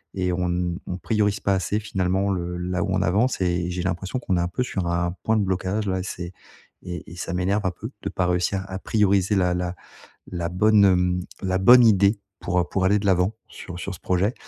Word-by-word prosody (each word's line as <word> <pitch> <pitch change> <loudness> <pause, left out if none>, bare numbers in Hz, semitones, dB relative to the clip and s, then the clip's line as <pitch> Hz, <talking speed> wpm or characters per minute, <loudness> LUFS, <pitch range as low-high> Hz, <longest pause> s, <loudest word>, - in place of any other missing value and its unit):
et 90 -1 0
on 90 0 -1
n 85 0 -1
on 90 - -3
priorise 105 0 0
pas 100 - +1
assez 95 +3 -1
finalement 95 -1 0
le 90 -1 -3
là 90 0 -2
où 100 - -2
on - - +1
avance 105 +5 +1
et 90 -1 0
j'ai 90 0 -3
l'impression 95 +5 -2
qu'on 95 -7 -1
est - - +1
un 85 - 0
peu 90 +8 -2
sur 95 -8 -3
un 85 0 0
point 110 0 +2
de 105 - +2
blocage, 95 +2 -1
là, 95 0 0
et 90 - -3
c'est 90 -2 -6 0.5
et 90 -2 -7
et 85 - -9
ça 90 - -4
m'énerve 95 +3 0
un 95 - +2
peu 110 +7 -8
de - - -2
pas 90 - -1
réussir 90 +2 0
à 95 0 -5
prioriser 100 -1 +2
la 90 -2 +2
la 90 0 -2 0.6
la 85 -1 -2
bonne, 105 +3 +4
hem, 90 -1 +3 0.2
la 95 -1 0
bonne 120 +5 +8
idée 100 0 +4 0.2
pour, 90 -1 0
heu, - - +1
pour 95 -1 0
aller 100 +2 +4
de 100 - -3
l'avant 95 +3 +2
sur 90 -1 -9
sur 95 +2 -4
ce 85 - -12
projet, 95 +6 0
95 Hz, 235 wpm, -24 LUFS, 90-100 Hz, 0.6 s, bonne